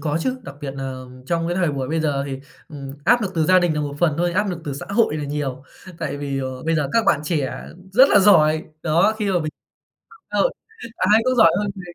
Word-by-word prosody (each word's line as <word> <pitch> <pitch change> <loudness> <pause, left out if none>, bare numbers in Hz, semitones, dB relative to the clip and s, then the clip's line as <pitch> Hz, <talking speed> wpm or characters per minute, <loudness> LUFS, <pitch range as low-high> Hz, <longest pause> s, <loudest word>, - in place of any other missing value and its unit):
có 155 +1 -1
chứ, 260 +7 -2
đặc 140 - -9
biệt 145 -3 -4
nà 135 -1 -5 0.3
trong 165 +2 -1
cái 175 - -2
thời 175 -5 +1
buổi 130 -2 -3
bây 160 +1 -1
giờ 145 -3 0
thì, 135 -1 -5 0.3
ừm, 140 -4 -8
áp 240 +1 +4
lực 195 -2 -3
từ 160 -1 +1
gia 185 +2 +6
đình 175 -3 +1
là 150 - -1
một 145 -1 -4
phần 165 -4 +2
thôi, 175 0 +1
áp 205 +2 0
lực 175 -2 -5
từ 145 - -4
xã 140 - -7
hội 200 -6 +1
là 150 - -4
nhiều. 140 -3 -4 0.4
Tại 140 0 -3
vì, 140 -1 -3
ờ, 130 -1 -5
bây 165 0 0
giờ 150 -3 0
các 230 -1 +2
bạn - - +3
trẻ 150 -4 -2 0.3
rất 260 +6 +7
là - - +5
giỏi! 160 -6 +4 0.2
Đó, 170 +7 +2
khi 210 - -1
mà 185 - +2
mình 155 -2 -4 0.6
mạng 450 - -18
xã - - -1
hội - - +3 0.4
ai 210 +4 +4
cũng 255 0 +1
giỏi 220 -8 +7
hơn 205 -1 -2
mình, 180 -3 -10
160 Hz, 260 wpm, -21 LUFS, 145-190 Hz, 0.6 s, rất